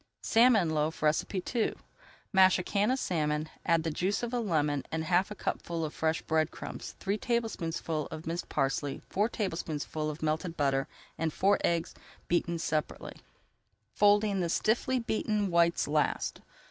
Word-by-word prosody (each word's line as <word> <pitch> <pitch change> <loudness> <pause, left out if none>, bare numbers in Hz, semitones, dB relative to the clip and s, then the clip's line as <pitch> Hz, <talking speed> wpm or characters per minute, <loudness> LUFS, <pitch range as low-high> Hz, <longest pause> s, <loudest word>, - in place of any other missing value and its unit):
SALMON 225 -7 +4
LOAF 155 +1 -1 0.3
II 215 +4 -1 0.6
Mash 190 -1 +6
a 180 - -3
can 205 +3 +1
of 260 - +2
salmon, 155 - -1
add 165 -2 +2
the 160 - -1
juice 190 +8 -1
of 240 +1 -3
a 245 - +1
lemon, 150 - 0
and 160 0 -1
half 180 +3 +2
a 210 - -6
cupful 170 -4 -3
of 155 - -6
fresh 160 0 0
bread 160 -1 +1
crumbs, - - -8
three 200 +2 -1
tablespoonfuls 165 - -2
of 155 - -7
minced 170 +2 -4
parsley, 135 0 -1
four 210 +4 +2
tablespoonfuls 160 -7 -3
of 155 +1 -6
melted 160 +2 -1
butter 135 -2 +1 0.3
and 160 0 0
four 200 +5 +2
eggs 170 -1 0 0.3
beaten 170 0 +1
separately, 155 -2 -3 0.8
folding 205 +1 +4
in 195 - -1
the 175 -2 0
stiffly 240 +8 +1
beaten 215 -4 -1
whites 170 0 +3
last. 150 0 0
170 Hz, 160 wpm, -30 LUFS, 155-205 Hz, 0.8 s, Mash